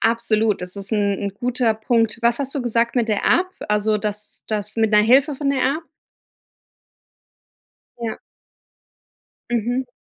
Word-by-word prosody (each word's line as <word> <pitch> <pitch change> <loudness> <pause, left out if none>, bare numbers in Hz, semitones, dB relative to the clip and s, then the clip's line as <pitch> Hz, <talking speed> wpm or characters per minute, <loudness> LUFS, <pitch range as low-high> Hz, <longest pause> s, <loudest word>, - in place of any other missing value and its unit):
Absolut, 225 -3 +1
das 180 +2 -5
ist 195 +1 -3
'n 205 -1 +2
'n 200 -1 -4
guter 245 0 +1
Punkt. 225 0 +1
Was 235 +1 +3
hast 275 0 -3
du 275 - -2
gesagt 235 0 0
mit 230 -2 +1
der 210 -2 0
App, 370 +1 +3 0.2
also, 210 0 +1
das 210 0 -4
das 210 0 -3
mit 220 -1 +2
'ner 210 0 +5
Hilfe 265 +6 +4
von 275 0 -1
der 270 -2 0
App? 325 - -8 2.2
Ja. 230 -2 -4 1.3
Mhm. 240 +2 -1
225 Hz, 150 wpm, -21 LUFS, 210-245 Hz, 2.2 s, ner